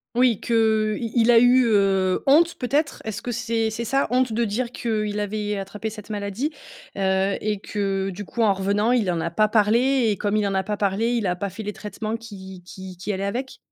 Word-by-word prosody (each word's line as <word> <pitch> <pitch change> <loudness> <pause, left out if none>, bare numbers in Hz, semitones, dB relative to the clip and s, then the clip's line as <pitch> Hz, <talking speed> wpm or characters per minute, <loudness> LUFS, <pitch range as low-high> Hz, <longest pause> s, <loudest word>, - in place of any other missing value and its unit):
Oui 245 -3 +3
que, 220 -2 +2
heu, - - -5
il 230 -2 -4 0.2
il 245 - +6
a 230 - +6
eu, 245 +1 +5
heu, 195 -3 +2
honte 325 +5 +5
peut-être? 280 +3 -1
Est-ce 220 -1 -4
que 245 - -4
c'est 230 -1 -1
c'est 225 +2 -4
ça 270 +4 +1
honte 250 -1 +2
de 235 +1 +1
dire 235 +3 -2
qu'il 215 -4 -2
avait 210 0 -2
attrapé 200 +3 -5
cette 210 -1 -11
maladie, 210 +7 -3 0.5
heu 190 0 +1
et 210 -1 -1
que, 195 -1 -2
du 195 +2 -6
coup, 235 - -4
en 215 -3 +4
revenant 200 +4 +1
il 215 -7 +2
en 170 - -1
a 170 - -1
pas 215 +6 +2
parlé 235 +5 +3
et 210 - +1
comme 205 +2 -1
il 205 - +1
en 195 - -2
a 190 - +1
pas 210 +2 -3
parlé, 205 +3 0
il 230 -5 0
a 180 - 0
pas 200 +3 -3
fait 190 +4 -8
les 210 0 -4
traitements 215 +2 -5
qui 190 -5 -11
qui 190 0 -10
qui 185 +4 -4
allaient 195 +1 -3
avec? 250 +6 -4
210 Hz, 230 wpm, -23 LUFS, 195-235 Hz, 0.5 s, il